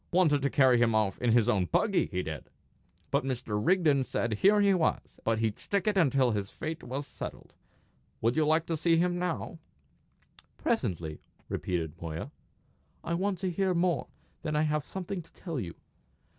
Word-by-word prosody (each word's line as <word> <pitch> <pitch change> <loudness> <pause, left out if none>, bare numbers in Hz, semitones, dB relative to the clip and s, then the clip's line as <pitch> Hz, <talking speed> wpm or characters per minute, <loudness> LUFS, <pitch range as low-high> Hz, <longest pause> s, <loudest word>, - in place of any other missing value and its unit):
Wanted 165 -5 +3
to 140 - +1
carry 130 -4 +5
him 115 -2 +3
off 105 -3 +1
in 120 -2 +2
his 115 -1 +4
own 100 -6 +2
buggy, 205 - +2
he 90 -1 -2
did! 80 -1 -6 0.6
But - - +2
Mr. 120 -5 -2
Rigden 160 -7 +3
said 115 -4 -2
here 205 +2 +5
he 200 -1 +5
was, 175 -4 -1
and 115 -1 +2
here 115 - +1
he'd 105 - -11
stick 200 -2 -1
until 140 - +3
his 100 -2 -2
fate 160 +1 -5
was 135 +4 -4
settled. - - -8 0.7
Would 115 +2 +1
you 155 - +3
like 160 +2 +3
to 165 - -1
see 165 +1 +3
him 175 +1 +1
now?" 175 -1 -3 1.0
"Presently," 85 - -1 0.3
repeated 85 -2 -3
Moya. 80 0 -5 0.7
"I 170 - -2
want 190 +2 0
to 185 -2 0
hear 185 +1 +1
more; 175 0 +1 0.3
then 155 -1 -2
I 150 - +3
may - - +2
have 150 -1 0
something 190 +2 -5
to 165 - -20
tell 165 -6 -5
you. 85 -7 -5
150 Hz, 185 wpm, -30 LUFS, 110-175 Hz, 1.0 s, carry